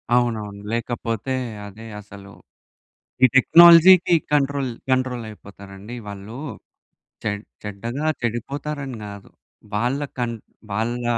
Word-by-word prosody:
అవునవును. 110 Hz, -4 st, -1 dB
లేకపోతే 115 Hz, +1 st, -3 dB, 0.3 s
అదే 110 Hz, +3 st, -12 dB, 0.2 s
అసలు, 100 Hz, -1 st, -13 dB, 0.9 s
ఈ -, -, +11 dB
టెక్నాలజీ‌కి 170 Hz, +4 st, +8 dB, 0.2 s
కంట్రోల్, 140 Hz, -2 st, +1 dB, 0.2 s
కంట్రోల్ 130 Hz, -2 st, 0 dB
అయిపోతారండి 100 Hz, +2 st, -11 dB
వాళ్ళు. 100 Hz, +5 st, -8 dB, 0.9 s
చెడ్ 105 Hz, 0 st, -2 dB, 0.2 s
చెడ్డగా 115 Hz, +8 st, -5 dB, 0.2 s
చెడిపోతారని 135 Hz, +3 st, -4 dB
కాదు. 100 Hz, -1 st, -10 dB, 0.4 s
వాళ్ళ 120 Hz, +6 st, 0 dB, 0.2 s
కన్ 120 Hz, -1 st, -2 dB, 0.4 s
వాళ్ళ 120 Hz, +4 st, -2 dB
120 Hz, 90 wpm, -22 LUFS, 105-135 Hz, 0.9 s, ఈ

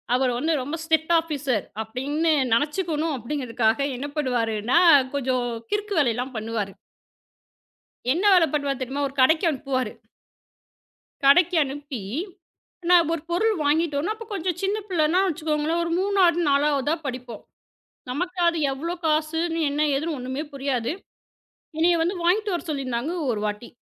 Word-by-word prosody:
அவர் 255 Hz, 0 st, +2 dB
வந்து 320 Hz, +6 st, 0 dB
ரொம்ப 290 Hz, +6 st, -4 dB
strict 320 Hz, 0 st, +1 dB
officer 280 Hz, -, -2 dB, 0.2 s
அப்படின்னு 285 Hz, +8 st, -1 dB, 0.2 s
நினைச்சுக்கணும் 310 Hz, +3 st, 0 dB
அப்படிங்கறதுக்காக 240 Hz, -3 st, -1 dB, 0.2 s
என்ன 280 Hz, +3 st, -4 dB
பண்ணுவாருன்னா, 240 Hz, -2 st, +1 dB, 0.4 s
கொஞ்சம் 255 Hz, -2 st, 0 dB, 0.3 s
கிறுக்கு 415 Hz, -1 st, -1 dB
வேலைலாம் 250 Hz, -1 st, 0 dB
பண்ணுவாரு. 215 Hz, -3 st, -3 dB, 1.4 s
என்ன 350 Hz, +7 st, -1 dB
வேலை 355 Hz, -3 st, +6 dB
பண்ணுவாரு 280 Hz, -3 st, -1 dB
தெரியுமா? 270 Hz, +3 st, -2 dB
ஒரு 270 Hz, -, -14 dB
கடைக்கு 315 Hz, +6 st, +4 dB
அனுப்புவாரு. 260 Hz, -5 st, -2 dB, 1.3 s
கடைக்கு 350 Hz, +5 st, +5 dB
அனுப்பி, 280 Hz, -2 st, -5 dB, 0.9 s
நான் 345 Hz, -3 st, +6 dB
1 330 Hz, -, -2 dB
பொருள் 430 Hz, +6 st, +2 dB
வாங்கிட்டு 300 Hz, +1 st, +1 dB
வரணும். 370 Hz, +9 st, -1 dB
அப்ப 455 Hz, 0 st, -10 dB
கொஞ்சம் 360 Hz, -2 st, -2 dB
சின்ன 395 Hz, +2 st, 0 dB
பிள்ளைன்னா 340 Hz, 0 st, +2 dB
வச்சுக்கோங்களேன், 315 Hz, 0 st, -1 dB
1 335 Hz, -, -3 dB
3வது 375 Hz, -4 st, +3 dB
4வது 280 Hz, -1 st, +2 dB
தான் 320 Hz, 0 st, -2 dB
படிப்போம். 250 Hz, -4 st, -6 dB, 0.7 s
நமக்கு 360 Hz, +8 st, -3 dB
அது 335 Hz, -1 st, 0 dB
எவ்வளவு 335 Hz, +6 st, -5 dB
காசுன்னு 320 Hz, +2 st, 0 dB
என்ன? 290 Hz, +1 st, -2 dB, 0.2 s
ஏதுன்னு 310 Hz, +2 st, -2 dB
ஒண்ணுமே 260 Hz, +4 st, -4 dB
புரியாது. 270 Hz, -3 st, -1 dB, 0.9 s
என்னைய 340 Hz, +2 st, +4 dB
வந்து 355 Hz, +4 st, -1 dB
வாங்கிட்டு 400 Hz, +4 st, +2 dB
வர 345 Hz, -, -3 dB
சொல்லிருந்தாங்க, 265 Hz, +1 st, -2 dB, 0.2 s
ஒரு 210 Hz, -3 st, -3 dB
வாட்டி. 210 Hz, +3 st, -5 dB
295 Hz, 135 wpm, -24 LUFS, 255-335 Hz, 1.4 s, வேலை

